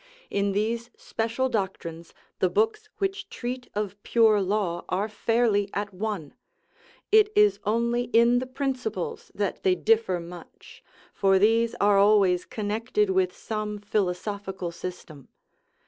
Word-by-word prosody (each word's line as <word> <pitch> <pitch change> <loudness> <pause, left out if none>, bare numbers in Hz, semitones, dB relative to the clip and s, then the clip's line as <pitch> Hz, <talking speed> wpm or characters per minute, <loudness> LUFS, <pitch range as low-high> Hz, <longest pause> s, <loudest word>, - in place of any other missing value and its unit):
In 200 0 0
these 230 +3 -1
special 230 +4 -2
doctrines 175 -7 -4 0.3
the - - +3
books 435 0 0
which 390 -1 -2
treat 250 +1 -5
of 205 -1 -3
pure 220 -3 +4
law 190 -3 -1
are 195 +3 0
fairly 215 -1 +1
at 205 -1 -3
one; 190 -6 -4 0.8
it 425 0 +6
is 420 0 +4
only 235 +3 +1
in 240 +1 +4
the 255 - -5
principles 285 - -3
that - - -2
they 380 -3 +3
differ 450 - +2
much, 175 +1 -12 0.3
for 195 -1 +3
these 225 +3 +3
are 200 0 +4
always 195 -3 +4
connected 230 - -1
with 375 -1 +2
some 215 -1 -4
philosophical 195 -2 -3
system. 165 -5 -8
215 Hz, 130 wpm, -26 LUFS, 195-250 Hz, 0.8 s, it